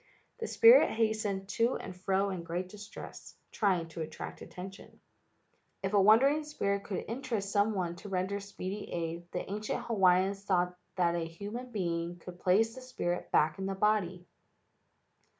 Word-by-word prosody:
The 455 - -3
spirit 470 +2 +7
hastened 215 -3 0
to 230 +4 +2
and 185 - -6
fro 195 +2 0
in 185 -2 -4
great 175 +2 -4
distress, 210 +1 -10 0.2
trying 185 -6 +1
to 165 - -6
attract 160 0 -6
attention. 190 +2 -10 0.8
If 195 +1 -1
a 200 - +6
wandering 270 +9 +5
spirit 200 -10 -2
could 195 - -3
interest 230 -4 -3
some 205 +1 +2
one 175 -3 -1
to 200 +4 -9
render 190 +2 -1
speedy 200 0 -6
aid, 170 0 -4
the 180 - -4
ancient 210 +2 -3
Hawaiians 195 -2 +3
thought 180 -2 +1 0.2
that 175 -2 +2
a 170 - 0
human 205 +9 -6
being 170 -4 -2
could 175 +1 -11
place 215 +6 +3
the 260 - -9
spirit 180 -9 -3
back 155 +3 +3
in 190 - -2
the 195 - -2
body. 190 -3 +1
195 Hz, 160 wpm, -31 LUFS, 180-215 Hz, 0.8 s, spirit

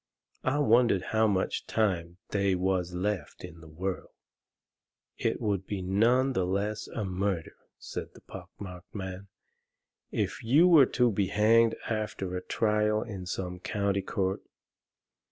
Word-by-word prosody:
I 130 +2 +1
wondered 120 -8 +4
how 110 0 +4
much 95 -3 -1
time 90 -6 0
they 100 -2 +1
was 90 -1 0
left 100 +1 -3
in 85 -2 -9
the 80 - -13
world. 90 +4 -4 1.1
"It - - 0
would 100 -3 -1
be 100 -3 -3
none 120 +8 +3
the 95 - +1
less 100 +4 -2
a 110 - -4
murder," 95 -2 -2 0.2
said - - -7
the - - -15
pock - - -10
marked 90 -1 -10
man, 95 0 -6 0.8
"if - - -2
you 145 +10 +5
were 155 -7 +7
to 125 -1 +2
be 100 -1 0
hanged 115 +3 +4
after 105 -4 -3
a 90 - -2
trial 105 +1 +1
in 95 -5 -7
some 90 -1 -4
county 100 0 -1
court. 95 -2 -1
100 Hz, 145 wpm, -29 LUFS, 90-110 Hz, 1.1 s, were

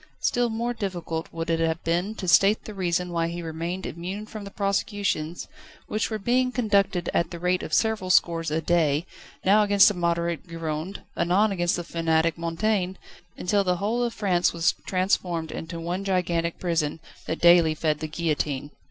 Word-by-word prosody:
Still 245 -1 +1
more 235 +2 -2
difficult 175 -7 -4
would 165 0 -3
it 165 - +1
have 165 0 0
been 175 +6 0
to 190 - -5
state 195 +4 +4
the 215 - -7
reason 180 -2 -1
why 165 -1 0
he 170 +1 -5
remained 165 +3 -4
immune 185 +6 -5
from 215 -1 -8
the - - -7
prosecutions, 200 -5 -1 0.4
which 215 - -1
were 220 - -2
being 250 +4 +1
conducted 200 -7 +1
at 170 -1 +1
the 170 - -7
rate 180 +1 0
of - - -6
several 220 -4 +1
scores 165 -3 +3
a 155 +2 0
day, 160 -2 +2 0.4
now 205 +3 +6
against 205 -1 +6
the - - -2
moderate 170 -1 -1
Gironde, 165 +2 -5
anon 200 +5 +2
against 175 -2 +1
the 175 - -3
fanatic 165 -1 +1
Mountain, 185 +3 -1 0.4
until 200 +2 +1
the 180 -1 +1
whole 215 +6 -1
of 240 -1 0
France 185 -6 +1
was 170 0 +2
transformed 180 -3 0
into 165 +1 -6
one 175 +3 -3
gigantic 175 -3 0
prison, 165 -4 -1 0.3
that 160 - -2
daily 170 -2 +6
fed 155 -1 0
the 155 - -3
guillotine. 150 -3 -2
175 Hz, 180 wpm, -25 LUFS, 165-200 Hz, 0.4 s, now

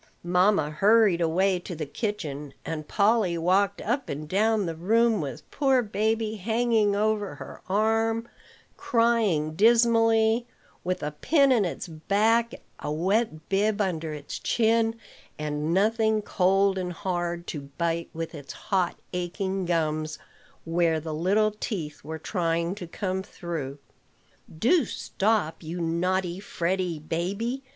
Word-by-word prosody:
Mamma 180 -3 +3
hurried 200 +2 +4
away 180 +3 +2
to 175 0 -7
the 155 -1 -4
kitchen; 150 - -4
and 155 -2 -4
Polly 205 -4 +2
walked 190 +4 +2
up 250 +5 -1
and 150 +2 -5
down 210 +4 +2
the 165 - -2
room 220 +4 +2
with 135 -4 -6
poor 265 -3 +2
baby 220 +1 -1
hanging 220 0 +1
over 210 -1 0
her - - -10
arm, 225 +3 +1 0.5
crying 225 -10 +2
dismally, 225 +1 +4 0.4
with 180 -2 -2
a 150 - -2
pin 275 - +3
in 230 -6 +4
its 175 - -4
back, 215 +8 +1 0.2
a 150 - -4
wet 175 0 0
bib 205 +2 +1
under 165 -6 -1
its 145 -1 -6
chin, 225 0 +2 0.4
and 150 +1 -2
nothing 220 +3 +2
cold 195 0 +2
and 180 -1 -3
hard 175 -1 -3
to 140 -5 -6
bite 170 0 -1
with 165 +1 -5
its 145 -3 -8
hot, 185 -4 -1 0.2
aching 190 +2 -2
gums, 155 -2 -1 0.5
where 165 -1 +1
the 155 0 -5
little 200 +7 +2
teeth 190 -8 -5
were 160 +2 -5
trying 170 0 -1
to 190 -4 -8
come 185 +2 -3
through. 165 -7 -6 0.8
"Do 300 - +4
stop, 200 -6 -1
you 170 +2 -5
naughty, 175 +2 0
fretty 180 -3 -2
baby. 195 - -3
190 Hz, 135 wpm, -26 LUFS, 165-220 Hz, 0.8 s, hurried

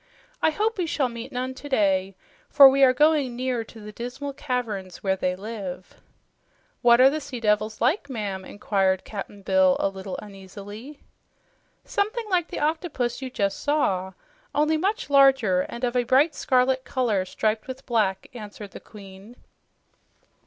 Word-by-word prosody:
"I - - +4
hope 425 +6 -1
we 350 - 0
shall 280 -5 0
meet 235 0 -8
none 255 +1 -3
today, 195 -9 0 0.3
for 280 -2 +9
we 270 +1 +4
are 260 - +7
going 285 -2 +2
near 250 -2 -2
to 225 - -14
the 210 0 -9
dismal 250 +6 -6
caverns 225 -10 -4
where 190 -1 +1
they 185 -1 -1
live." 195 -3 -8 0.8
"What 240 -1 +6
are 260 +1 +8
the 310 +1 -3
sea 270 -3 -7
devils 215 0 0
like, 285 - +1
ma'am?" 205 -6 -4
inquired 190 -1 0
Cap'n 205 -1 -8
Bill 190 -1 +3
a - - +1
little 190 0 -7
uneasily. 205 +6 -10 0.8
"Something 430 +3 -2
like 350 -2 +2
the - - -6
octopus 295 -6 -2
you 260 - -4
just 200 -5 -1
saw, 190 -11 0 0.4
only 305 +2 +2
much 390 +3 -1
larger 265 -10 +5
and 235 - -8
of 245 0 0
a 250 - +4
bright 275 +6 +3
scarlet 255 0 +1
color, 230 -9 0
striped 215 +3 -2
with 260 +1 -8
black," 210 -5 0
answered 210 -3 -9
the - - -9
Queen. 200 +2 -13
240 Hz, 160 wpm, -25 LUFS, 200-275 Hz, 0.8 s, for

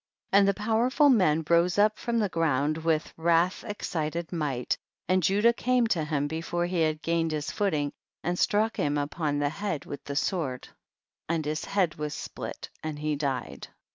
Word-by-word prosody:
60. 200 - +8
And 200 - +4
the 200 - +4
powerful 230 +7 +3
man 165 - +3
rose 170 +2 +3
up 210 +1 +3
from 235 -1 -1
the 215 -3 +2
ground 155 -4 +1
witli 160 -1 0
wrath 170 +2 +2
ex 205 -1 -4
cited 165 0 -3
might, 145 -7 -1 0.3
and 185 +1 +3
Judah 205 +7 +4
came 250 0 +2
to 175 -8 +1
him 150 -2 -1
before 165 +3 -2
he 175 -1 0
had 155 -1 0
gained 165 -1 +1
his 150 -1 -2
footing, 155 -8 0 0.3
and 175 +1 -1
struck 220 +2 +2
him 145 0 +1
upon 145 +1 -1
the 145 0 +1
head 195 -3 -3
with 140 - -7
the 140 - -5
sword, 145 -5 -1 0.6
and 160 -2 0
his 155 +1 -2
head 185 -6 +1
was 150 -1 -3
split - - -7
and 155 -1 -4
he 150 0 -1
died. 130 - -3
165 Hz, 185 wpm, -28 LUFS, 150-195 Hz, 0.6 s, 60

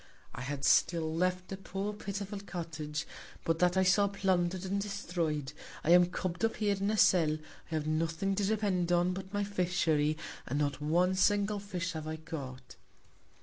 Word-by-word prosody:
I - - -6
had 140 +1 -3
still 160 -2 +3
left 180 +2 0
a 195 - -3
poor, 195 +2 -4
pitiful 200 0 -5
Cottage, 160 -5 -5 0.4
but 165 0 0
that 180 +1 +3
I 190 - +5
saw 200 +2 +4
plunder'd 185 -2 0
and 200 +1 -1
destroy'd. 170 -8 -2 0.3
I 165 - +2
am 175 0 +7
cubb'd 180 0 -3
up 225 - +2
here 205 -2 +1
in 200 +1 -1
a 215 - +1
Cell; 160 -6 +4 0.3
I - - -1
have 155 -1 -1
nothing 165 +5 0
to 200 +1 0
depend 195 -4 +1
upon 175 +1 +3
but 190 0 -7
my 205 0 0
Fishery, 170 -6 +1 0.3
and 140 - -1
not 145 0 -1
one 175 +5 +2
single 205 +2 +2
Fish 185 -3 -3
have 155 -1 -5
I 155 - -3
caught. 135 -6 -8
180 Hz, 180 wpm, -32 LUFS, 160-195 Hz, 0.4 s, am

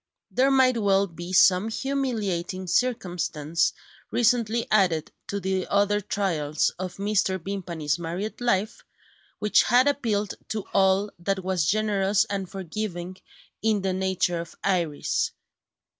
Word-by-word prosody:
There 265 +2 +3
might 260 -3 +4
well 200 -1 +3
be 175 0 -8
some 185 +2 +5
humiliating 220 -9 -2
circumstance, 175 -7 0 0.4
recently 235 -1 +2
added 180 -7 +2 0.2
to 200 - -3
the 190 -1 -1
other 205 +1 +2
trials 160 -7 0
of 185 -1 -4
Mrs. 195 -3 0
Vimpany's 170 -6 -2
married 175 +8 -4
life, 220 -2 0 0.5
which 210 0 +4
had 250 +3 +4
appealed 220 -8 0
to 215 -2 -4
all 195 +1 +3
that 190 +2 -2
was 180 -5 0
generous 205 -1 +2
and 195 -2 -4
forgiving 185 -1 -5 0.4
in 215 -3 +1
the 190 -1 0
nature 185 -2 0
of 170 - -11
Iris. 170 -6 0
195 Hz, 125 wpm, -25 LUFS, 180-215 Hz, 0.5 s, some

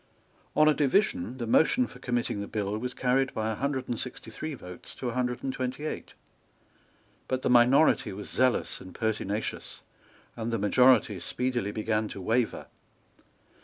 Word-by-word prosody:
On 155 - +5
a 155 - +6
division 135 - +1
the 120 - -3
motion 195 - +4
for - - -12
committing 120 -4 -1
the 100 - -5
bill 105 -1 -2
was 125 +2 -4
carried 130 +1 +1
by 110 0 -1
a - - -2
hundred 135 +1 -2
and 120 - -2
sixty 120 -2 -6
three 155 +6 -5
votes 90 -7 -11
to 125 - -3
a - - -4
hundred 125 -1 -1
and 135 - -2
twenty 130 +3 -3
eight. - - -5 1.1
But 130 0 -2
the - - +2
minority 125 +6 +5
was 100 +2 -7
zealous 130 0 +1
and 95 - -11
pertinacious; 110 -1 -3 0.5
and 115 0 -3
the 115 - 0
majority 110 -1 +4
speedily 120 +3 -2
began 110 0 -1
to 100 - -7
waver. 115 +5 0
120 Hz, 165 wpm, -28 LUFS, 110-130 Hz, 1.1 s, a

